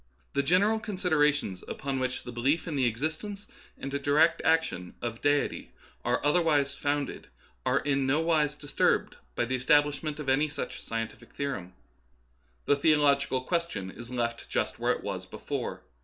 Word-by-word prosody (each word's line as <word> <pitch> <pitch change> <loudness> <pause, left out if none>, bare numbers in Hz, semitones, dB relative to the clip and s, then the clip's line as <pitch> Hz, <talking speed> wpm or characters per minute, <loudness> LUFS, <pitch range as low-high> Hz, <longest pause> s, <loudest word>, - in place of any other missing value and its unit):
The 140 - +2
general 195 +9 +3
considerations 155 - +1
upon 135 -1 -3
which 130 0 -2
the 125 - -7
belief 135 +9 +1
in 160 - -2
the 130 -3 +3
existence 160 - -3 0.3
and 135 - -5
direct 145 +4 +3
action 160 - +1
of 115 -1 -4
Deity 145 0 +1 0.3
are 125 +3 0
otherwise 145 -3 +3
founded 145 0 -2 0.4
are - - +3
in 140 -2 +1
no 140 +4 +3
wise 155 -3 +2
disturbed 145 -1 +1 0.2
by - - +1
the 125 - -3
establishment 145 +3 +2
of 150 - -5
any 145 +3 +3
such 145 0 -5
scientific 115 -1 -5
theorem. 130 -11 -4 0.9
The 145 - +4
theological 140 -3 +3
question 170 - -2
is 120 +4 -9
left 120 -2 -2
just - - -1
where - - +2
it - - -7
was - - -4
before. - - -4
145 Hz, 155 wpm, -29 LUFS, 130-155 Hz, 0.9 s, The